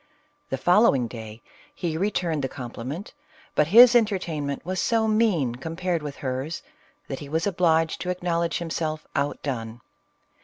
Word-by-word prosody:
The 135 - -1
following 175 - +4
day 110 -1 -9 0.3
he 165 -3 -2
returned 170 -5 -1
the 135 - -1
compliment, 130 - -7 0.4
but 150 - +3
his 240 +7 +8
entertainment 170 -12 0
was 185 0 -1
so 225 -1 +2
mean 210 - +2
com 150 +7 -6
pared 180 -2 -1
with 145 -2 -6
hers, 130 +5 -3 0.4
that 135 - -5
he 145 - -9
was 160 +3 0
obliged 165 -4 +2
to 180 - -3
acknowledge 170 -2 -1
himself 160 -2 -3
outdone. 130 -5 -2
160 Hz, 145 wpm, -25 LUFS, 135-180 Hz, 0.4 s, his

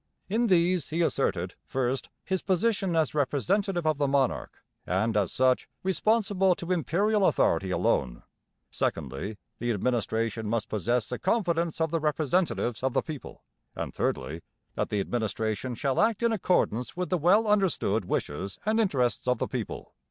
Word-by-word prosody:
In 230 +4 +1
these 175 -4 +2
he 165 +2 +1
asserted: 90 - 0
first, 130 0 -1 0.2
his 190 -1 -1
position 195 -1 +1
as 160 -3 +2
representative 175 +6 0
of 155 -2 +1
the 145 - +2
monarch, 135 -1 0 0.3
and, 100 +5 +1
as 100 -4 +1
such, 130 0 +2
responsible 195 -1 +2
to 170 +1 -5
Imperial 195 +5 +2
authority 95 +3 +2
alone; 65 -8 0 0.5
secondly, 100 +10 -3 0.2
the 120 - -2
administration 110 -1 -1
must 115 0 -1
possess 110 +3 0
the 125 - -4
confidence 170 -6 0
of 160 -1 +1
the 165 - +1
representatives 150 -4 0
of 130 -1 0
the - - +1
people; 155 -4 -8 0.3
and - - -4
thirdly, 80 +3 -2 0.3
that - - -2
the 105 - 0
administration 110 +2 -2
shall 135 +3 0
act 225 0 +2
in 235 - +3
accordance 175 - 0
with 180 0 -2
the 180 - +3
well 190 +8 +4
understood 190 - +1
wishes 90 +2 -3
and 220 +1 +2
interests 125 - +1
of 125 - +3
the - - -2
people. - - -5
145 Hz, 155 wpm, -28 LUFS, 115-185 Hz, 0.5 s, well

